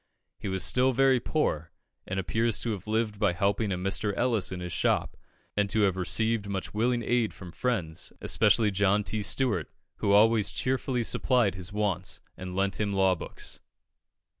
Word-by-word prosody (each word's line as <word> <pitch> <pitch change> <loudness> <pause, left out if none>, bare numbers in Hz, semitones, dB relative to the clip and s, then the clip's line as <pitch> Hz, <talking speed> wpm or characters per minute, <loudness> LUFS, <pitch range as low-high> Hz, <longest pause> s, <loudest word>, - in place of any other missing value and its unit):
He - - -5
was 95 -1 -1
still 130 +5 +3
very 135 0 +4
poor, 85 - -1 0.4
and 95 +1 -2
appears 110 +3 0
to 115 - -1
have 100 -2 -6
lived 110 -1 -1
by 105 -4 +2
helping 100 +3 0
a 90 - -1
Mr. 100 +2 -1
Ellis 115 -7 +1
in 90 - -4
his 90 -1 -5
shop, - - 0 0.4
and 105 -1 +1
to 110 - +1
have 95 -3 +3
received 110 +3 0
much 95 -2 -4
willing 120 +2 +1
aid 120 -2 0
from 90 -3 -10
friends, 85 -4 -2
especially 105 0 +3
John 100 +1 +2
T. 110 +1 -2
Stuart, 105 - +1 0.3
who 100 - 0
always 105 0 +5
cheerfully 130 -1 -1
supplied 120 -3 +2
his 90 0 -6
wants, 100 -4 -2 0.2
and 90 0 -7
lent 100 0 0
him 105 -1 0
law 95 -1 +3
books. 90 - -7
105 Hz, 175 wpm, -28 LUFS, 95-115 Hz, 0.4 s, always